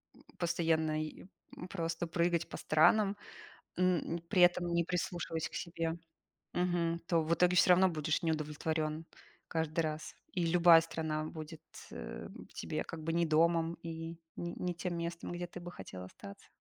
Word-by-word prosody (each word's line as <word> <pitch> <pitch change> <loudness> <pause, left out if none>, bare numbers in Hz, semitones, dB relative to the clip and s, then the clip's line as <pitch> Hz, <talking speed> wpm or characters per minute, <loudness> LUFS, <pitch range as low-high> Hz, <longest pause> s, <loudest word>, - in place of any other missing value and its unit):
м, - - -19
постоянно, 160 -3 +1
е 155 +3 -7 0.3
м, 180 - -6
просто 165 -2 -2
прыгать 170 0 +1
по - - -6
странам, 200 +6 +4 0.6
м, 180 -2 +1
при 190 -4 +3
этом 175 0 +5
не 170 0 +2
прислушиваясь 175 -3 -2
к - - -23
себе, 165 -1 -3 0.5
мгм, 175 -1 +1
то 165 -2 +3
в 165 +2 +1
итоге 180 +1 +4
всё 180 - +7
равно 185 +1 +6
будешь 155 -1 -1
неудовлетворён 155 0 -1 0.4
каждый 160 0 -1
раз. 155 0 -4 0.2
И 175 -2 0
любая 170 0 +7
страна 160 -2 -2
будет, 155 0 -8 0.3
э, - - -7 0.2
тебе - - -3
как 160 -1 -7
бы 165 - -1
не 170 0 +3
домом 165 +1 +3
и 165 0 -5 0.3
н 170 0 -4
не 180 -1 -1
тем 175 0 -3
местом, 170 0 -4
где 175 0 -3
ты 180 - -9
бы 175 0 -8
хотел 90 - -8
остаться. 200 - -11
165 Hz, 165 wpm, -33 LUFS, 160-175 Hz, 0.6 s, всё